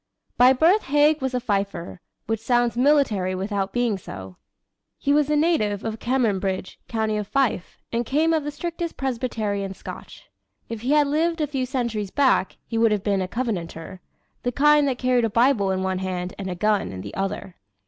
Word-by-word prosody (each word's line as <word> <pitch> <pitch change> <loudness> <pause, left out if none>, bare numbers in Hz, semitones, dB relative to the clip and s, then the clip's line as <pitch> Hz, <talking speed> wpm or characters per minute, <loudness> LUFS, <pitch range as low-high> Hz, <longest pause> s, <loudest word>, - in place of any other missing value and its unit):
By 250 +1 +7
birth 335 +10 +3
Haig 295 +2 +3
was 260 -1 -1
a - - +1
"Fifer," 200 -6 -3 0.2
which 225 -1 -1
sounds 240 0 +1
military 245 -9 +2
without 195 +1 -2
being 235 -4 0
so. 95 - -9 0.6
He 285 - +1
was 295 0 +3
a 300 - +2
native 255 - +1
of 225 0 -4
Cameronbridge, 200 -7 -1
County 220 -2 -1
of 210 -1 -3
Fife, 265 -9 0
and 235 +1 0
came 310 +7 +1
of 315 -2 +1
the 295 - -3
strictest 340 +2 -5
Presbyterian 220 -7 -2
Scotch. - - -10 0.5
If 230 -2 -5
he 260 +5 +1
had 300 -1 +5
lived 325 +4 0
a 305 - +2
few 265 -3 -2
centuries 235 -6 -2
back 265 -6 +2
he 225 - -2
would 225 -1 +4
have 205 -2 0
been 200 -2 +1
a 185 - -2
Covenanter 185 -6 -4 0.4
the 245 - -1
kind 295 +2 +4
that 260 -2 -1
carried 250 -2 +2
a - - 0
Bible 230 -2 +3
in 190 0 0
one 190 -1 -1
hand 185 -1 -3
and 190 -1 -4
a 180 - -3
gun 210 +2 +1
in 95 -1 -7
the - - -8
other. 195 -1 -4
230 Hz, 190 wpm, -24 LUFS, 195-275 Hz, 0.6 s, By